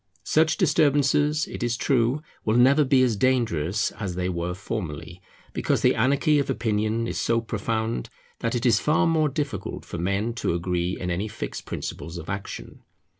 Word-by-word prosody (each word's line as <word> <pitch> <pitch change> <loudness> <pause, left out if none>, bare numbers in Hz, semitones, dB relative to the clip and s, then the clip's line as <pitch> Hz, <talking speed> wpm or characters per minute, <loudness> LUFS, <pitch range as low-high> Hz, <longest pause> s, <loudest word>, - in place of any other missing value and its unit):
Such 160 +1 +2
disturbances, 150 -3 +3
it - - -7
is 120 -1 0
true, 130 +3 +1 0.2
will 110 +2 +2
never 135 +5 +6
be 130 -1 +4
as 120 -4 +2
dangerous 110 -6 +1
as 95 -5 -3
they 90 0 -1
were 90 0 -2
formerly, 90 -4 -5 0.3
because - - 0
the - - +5
anarchy 145 +3 +3
of 140 - -1
opinion 110 0 0
is - - -3
so 115 0 +2
profound 110 - -2 0.3
that 115 +1 -1
it 120 - -1
is 120 - +5
far 155 +1 +2
more 160 -2 +2
difficult 140 -8 -4
for 85 - -6
men 100 +6 0
to - - 0
agree 90 +1 -1
in 90 0 -2
any 95 +5 -1
fixed 110 +1 -6
principles 85 +1 -5
of 85 +1 -6
action. 100 0 -7
115 Hz, 175 wpm, -25 LUFS, 95-135 Hz, 0.3 s, never